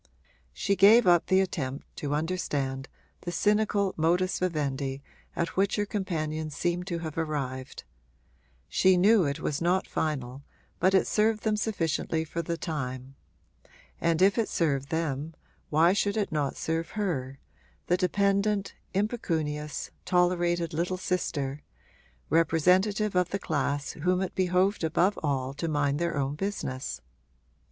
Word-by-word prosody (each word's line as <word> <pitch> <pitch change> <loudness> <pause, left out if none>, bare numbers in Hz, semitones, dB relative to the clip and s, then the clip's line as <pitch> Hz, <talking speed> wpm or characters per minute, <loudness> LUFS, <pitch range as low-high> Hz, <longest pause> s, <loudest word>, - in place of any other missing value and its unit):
She 140 - 0
gave 210 +5 +7
up 175 -2 +4
the 190 0 +4
attempt 140 -7 -3
to 145 0 -2
understand 145 -5 -2 0.3
the 175 - -4
cynical 205 +1 +1
modus 175 +4 +1
vivendi 140 -6 -2 0.3
at 170 - 0
which 195 +2 +2
her 205 - 0
companions 155 -7 -3
seemed 175 +2 -1
to 175 -3 -2
have 160 0 -4
arrived; 135 -5 -4 0.8
she 185 -1 +4
knew 200 0 +5
it 140 0 -2
was 145 - -2
not 180 +2 +2
final 135 -4 -3 0.4
but 190 +2 +3
it 190 - +4
served 215 0 +1
them 215 -1 +2
sufficiently 165 -6 -1
for 170 +2 -3
the 170 +1 -3
time; 130 -5 -4 0.9
and 165 +1 +2
if 200 +4 +4
it 220 - 0
served 140 -4 0
them 160 -1 -2 0.3
why 165 +4 +4
should 205 +1 0
it 205 -4 -1
not 145 -3 -1
serve 165 +1 -2
her, 135 -10 -2 0.5
the 175 - +2
dependent, 200 +2 +1 0.2
impecunious, 160 - -2
tolerated 175 -2 +1
little 175 +3 -1
sister, 150 -6 -2 0.7
representative 185 +6 +2
of 180 -1 +2
the 200 - -1
class 145 -5 -1
whom 180 +4 0
it 190 - -4
behoved 185 +1 +1
above 175 +5 +2
all 135 -3 -1
to 150 +4 -3
mind 145 -2 0
their 170 -2 -1
own 140 0 0
business? 135 - -4
170 Hz, 140 wpm, -28 LUFS, 145-190 Hz, 0.9 s, gave